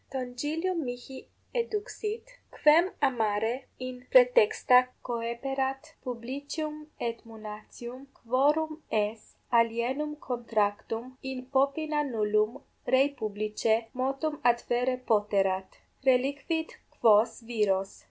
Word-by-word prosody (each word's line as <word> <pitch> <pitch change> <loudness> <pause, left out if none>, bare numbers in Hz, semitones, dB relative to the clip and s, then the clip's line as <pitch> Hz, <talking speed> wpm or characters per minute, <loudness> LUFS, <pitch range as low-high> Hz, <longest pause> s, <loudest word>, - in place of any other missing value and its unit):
Tongilium 295 +8 -2
mihi 245 +1 -7 0.2
eduxit, 445 -1 -3 0.4
quem 320 +5 +7
amare 230 -1 +1
in 255 -1 -7
praetexta 450 - +6 0.2
coeperat, 265 +5 -3
Publicium 285 +5 -5
et 230 -1 -3
Munatium, 225 +4 -9
quorum 300 +6 +1
aes 215 +1 -1 0.2
alienum 240 +6 +1
contractum 230 -1 -2
in 260 -1 -5
popina 295 +3 +2
nullum 215 -1 0 0.3
rei 270 +2 +6
publicae 215 +2 0
motum 275 +4 -1 0.2
adferre 245 +2 -1
poterat: 195 -3 +2 0.3
reliquit 280 +5 +1 0.3
quos 225 +2 +5
viros! 195 -4 +1
255 Hz, 85 wpm, -29 LUFS, 225-290 Hz, 0.4 s, quem